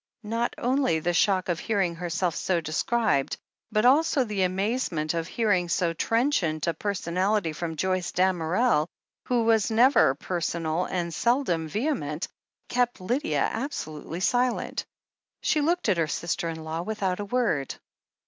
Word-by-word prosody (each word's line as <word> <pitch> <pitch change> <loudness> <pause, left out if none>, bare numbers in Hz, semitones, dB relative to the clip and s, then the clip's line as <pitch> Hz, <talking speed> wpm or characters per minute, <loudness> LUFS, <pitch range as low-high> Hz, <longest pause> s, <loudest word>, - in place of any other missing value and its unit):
Not 230 +3 -1
only 255 - +1
the 175 +3 0
shock 185 +1 +2
of 175 -2 -1
hearing 195 -6 0
herself 175 0 -1
so 185 -2 0
described, 160 - 0 0.3
but 215 +1 +2
also 280 +1 +4
the 210 -4 -2
amazement 185 -4 0
of 165 -1 -2
hearing 185 -5 +1
so 170 0 +1
trenchant 195 - +1
a 170 - +1
per 200 +6 -2
sonality 185 0 0
from 165 -1 -4
Joyce 185 +2 -1
Damerel, 180 0 +2 0.4
who 245 -2 +1
was 225 -1 +3
never 230 - +5
personal, 170 +1 -2
and 170 -2 -3
seldom 235 - +1
vehement, 195 - -2 0.4
kept 245 -2 0
Lydia 245 +11 0
absolutely 165 - -5
silent. 245 +4 0 0.6
She 305 - +2
looked 340 +2 +1
at 195 -4 +3
her 165 -2 +1
sister 170 +2 -2
in 160 -1 -6
law 160 +1 -3
without 195 -1 -2
a 205 - -3
word. 205 - 0
185 Hz, 145 wpm, -26 LUFS, 165-235 Hz, 0.6 s, never